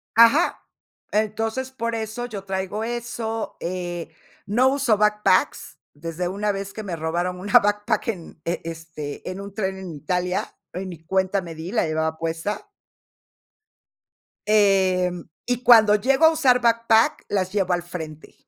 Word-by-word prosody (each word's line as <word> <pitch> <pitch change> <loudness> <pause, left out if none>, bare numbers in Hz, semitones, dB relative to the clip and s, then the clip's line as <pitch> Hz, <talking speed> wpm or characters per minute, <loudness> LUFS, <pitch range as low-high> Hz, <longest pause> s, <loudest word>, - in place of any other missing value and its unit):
Ajá, 230 +8 +5 0.5
entonces, 220 +5 -1
por 230 -2 -3
eso 225 +2 -4
yo 205 -5 -7
traigo 190 +2 -3
eso, 235 -1 -4
eh, 175 -1 -4 0.4
no 240 +6 +3
uso 265 -5 +2
backpacks 210 -7 +2 0.2
desde 165 +3 -4
una 205 +2 -1
vez 195 0 -5
que 215 - -6
me 185 -5 -4
robaron 175 +3 -2
una 200 +2 +6
backpack 205 +2 0
en, 175 -6 -5
este, 160 -3 -5
en 185 +1 -6
un 200 0 -9
tren 190 -3 -2
en 180 -4 -7
Italia, 180 +5 -2 0.2
y 190 +1 -4
ni 170 -3 -9
cuenta 190 +2 +1
me 170 -2 -8
di, 160 +4 -7
la 225 - +2
llevaba 160 0 -1
puesta. 165 +6 -3 1.8
Em, 190 -4 +3 0.2
y 245 0 -1
cuando 225 -4 +7
llego 265 +8 +3
a - - +7
usar 270 -6 +3
backpack, 230 +4 +3
las 185 -2 -1
llevo 190 -3 +1
al 175 0 +1
frente, 160 -3 -8
195 Hz, 145 wpm, -23 LUFS, 175-225 Hz, 1.8 s, cuando